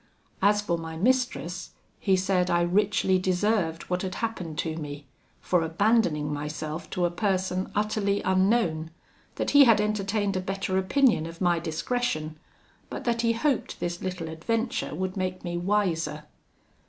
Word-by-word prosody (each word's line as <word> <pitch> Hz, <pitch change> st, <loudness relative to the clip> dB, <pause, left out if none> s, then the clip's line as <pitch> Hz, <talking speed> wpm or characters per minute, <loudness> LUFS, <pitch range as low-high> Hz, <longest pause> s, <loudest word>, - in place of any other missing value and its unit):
As 205 Hz, +1 st, +4 dB
for 170 Hz, -4 st, -1 dB
my 160 Hz, 0 st, -6 dB
mistress, 220 Hz, -5 st, 0 dB, 0.3 s
he 195 Hz, -, +3 dB
said 185 Hz, -1 st, +1 dB
I 175 Hz, 0 st, +3 dB
richly 190 Hz, +1 st, +2 dB
deserved 185 Hz, -2 st, 0 dB
what 180 Hz, 0 st, -2 dB
had 185 Hz, -1 st, -4 dB
happened 185 Hz, -9 st, -4 dB
to 160 Hz, -1 st, -2 dB
me, 145 Hz, -2 st, -6 dB, 0.4 s
for 180 Hz, -2 st, +2 dB
abandoning 165 Hz, -3 st, +2 dB
myself 150 Hz, +2 st, -5 dB
to 180 Hz, -, 0 dB
a 175 Hz, -, 0 dB
person 185 Hz, -1 st, -1 dB
utterly 205 Hz, -1 st, +1 dB
unknown; 185 Hz, -4 st, +2 dB, 0.5 s
that -, -, -1 dB
he 285 Hz, -1 st, +8 dB
had 230 Hz, -3 st, +5 dB
entertained 205 Hz, -1 st, 0 dB
a 185 Hz, -, 0 dB
better 195 Hz, 0 st, -2 dB
opinion 210 Hz, -, +3 dB
of 165 Hz, 0 st, -10 dB
my 175 Hz, -2 st, +2 dB
discretion; 160 Hz, -1 st, -2 dB, 0.5 s
but -, -, -6 dB
that 235 Hz, -1 st, +1 dB
he 230 Hz, -1 st, +2 dB
hoped 260 Hz, +3 st, -1 dB
this 175 Hz, 0 st, -3 dB
little 180 Hz, -3 st, -4 dB
adventure 225 Hz, +9 st, -2 dB
would 185 Hz, 0 st, -3 dB
make 185 Hz, -1 st, -3 dB
me 175 Hz, -1 st, -3 dB
wiser. 175 Hz, -5 st, 0 dB
185 Hz, 155 wpm, -27 LUFS, 165-210 Hz, 0.5 s, he